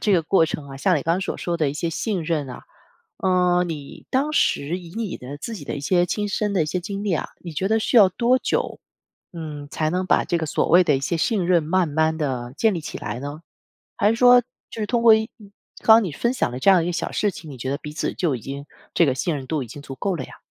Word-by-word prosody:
这 210 - +2
个 175 -3 +4
过 165 0 +3
程 150 -2 -5
啊， 135 - -8
像 180 +6 +2
你 145 - -2
刚 165 +1 +1
刚 185 - -2
所 195 - -3
说 175 -1 -2
的 155 -3 +1
一 - - -7
些 165 +2 -2
信 195 +2 -2
任 155 -4 -1
啊。 125 - -9 0.5
呃， 180 -1 +2
你 155 -5 -7
当 285 +4 0
时 160 - +1
以 175 -2 -11
你 220 -3 -3
的 135 +3 -8
自 230 +9 -6
己 - - -8
的 - - -5
一 - - -4
些 175 +5 +2
亲 205 +4 -2
身 210 +1 -1
的 190 -4 +1
一 - - -3
些 175 +4 -2
经 200 +2 -5
历 200 - 0
啊， 160 - -2
你 170 -3 -8
觉 190 +6 -1
得 220 0 +3
需 220 - -1
要 205 -5 +8
多 245 +6 +2
久， - - -2 0.5
嗯， 150 -4 -7
才 155 -1 0
能 180 +3 -1
把 - - +2
这 170 - 0
个 160 - -2
所 155 - 0
谓 180 +2 +6
的 150 -5 +2
一 - - -4
些 135 +5 -1
信 185 +2 0
任 175 -3 +3
慢 180 +3 +1
慢 160 +1 +1
地 130 -5 -3
建 220 -2 +3
立 170 - -3
起 - - -6
来 120 - -5
呢？ 145 +3 -6 0.6
还 205 - +3
是 - - +2
说 245 +1 +7 0.3
就 225 - -7
是 210 - -1
通 235 +1 0
过 230 -1 +8
一 220 0 0 0.5
刚 220 - +8
刚 230 - +3
你 175 - -4
分 235 - 0
享 190 - -1
的 125 - -5
这 195 - +5
样 190 - +6
的 165 - 0
一 - - -3
个 175 - -1
小 - - -3
事 205 -2 0
情， 160 -4 -10
你 135 - -9
觉 130 - -4
得 140 - 0
彼 150 -1 -8
此 155 - -3
就 160 -7 0
已 - - -9
经 140 +4 -7 0.3
这 170 - +5
个 140 - +2
信 160 +4 -1
任 135 - -5
度 155 -4 -1
已 - - -11
经 140 +6 -10
足 135 -2 -8
够 195 +8 -1
了 170 - -4
呀？ - - -13
170 Hz, 310 characters per minute, -23 LUFS, 150-200 Hz, 0.6 s, 要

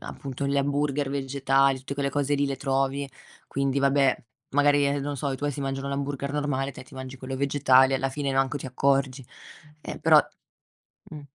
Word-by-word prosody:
appunto 140 -1 -5
gli 140 0 +1
hamburger 145 0 0
vegetali, 135 0 +1
tutte 135 +2 -6
quelle 140 0 -1
cose 145 0 0
lì 145 - +1
le 140 -1 -2
trovi. 135 0 -1 0.4
Quindi 140 0 0
vabbè, 140 -1 +3 0.4
magari, 145 0 +3
ehm, 140 0 0
non 145 +1 -3
so, 140 +1 -2
i 130 - -3
tuoi 145 +1 -1
si 140 0 -5
mangiano 135 0 -3
l'hamburger 140 0 -3
normale, 145 -2 -1
te 130 - -10
ti 130 - -20
mangi 130 0 -7
quello 130 +1 -6
vegetale 135 -1 +4
e - - +3
alla 135 0 -1
fine 140 -1 -2
manco 135 +2 +1
ti - - -7
accorgi. 135 0 0 0.6
Eh, - - -7
però - - +6 0.9
mh. 150 - -8
140 Hz, 190 wpm, -26 LUFS, 135-140 Hz, 0.9 s, però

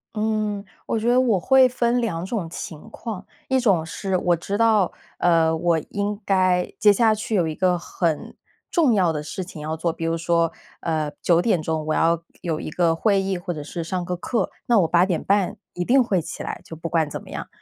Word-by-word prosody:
嗯， 215 -1 -1 0.2
我 - - -1
觉 235 +2 0
得 250 - +5
我 235 -7 +3
会 260 +7 +5
分 245 -1 +1
两 175 -8 -2
种 190 -2 -3
情 165 +2 -8
况。 215 -5 -6 0.2
一 265 0 +2
种 195 -9 +3
是 190 +3 -3
我 175 -1 +2
知 195 +4 -3
道， 220 -5 +4 0.3
呃， 165 -2 +3
我 170 0 +1
应 205 0 -2
该 185 -2 +2
接 210 -1 +6
下 220 0 +3
去 215 +1 -5
有 175 -5 +2
一 155 - -4
个 180 -2 +2
很 170 -2 -2 0.3
重 305 -9 +3
要 185 -5 +3
的 150 -2 -3
事 185 +5 -5
情 175 -4 -10
要 155 +1 -3
做， 165 +1 -1
比 165 0 -5
如 165 0 +1
说， 170 0 +1 0.3
呃， 155 -3 -1
9 170 -1 +4
点 185 -4 +2
钟 160 0 -1
我 155 - +1
要 165 0 +2 0.2
有 160 -3 -2
一 - - -5
个 165 +1 +2
会 200 +4 +2
议 190 -1 -1
或 175 0 -4
者 150 - -6
是 165 +3 -5
上 180 +1 -3
个 180 0 -2
课， 230 +6 -2 0.2
那 235 -2 +4
我 165 - +2
8 175 +1 +4
点 180 -4 0
半 200 -2 +1 0.2
一 180 - -2
定 260 +6 +4
会 190 -7 +1
起 - - -7
来， - - -5
就 160 - -9
不 165 +1 -5
管 160 -3 +1
怎 - - -5
么 - - -15
样。 - - -5
180 Hz, 235 characters per minute, -23 LUFS, 165-215 Hz, 0.3 s, 接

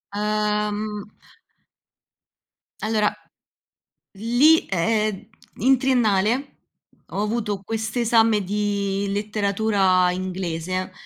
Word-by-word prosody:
Ehm 210 0 -1 1.8
Allora, 215 -1 +1 1.0
lì 245 +10 +4
ehm, 210 +2 0 0.3
in 265 +3 +4
triennale, 245 0 +1 0.6
ho 200 - -4
avuto 210 -2 -2
quest'esame 225 0 +1
di 200 0 -1
letteratura 200 -3 +1
inglese, 185 -1 -3
210 Hz, 65 wpm, -23 LUFS, 195-220 Hz, 1.8 s, lì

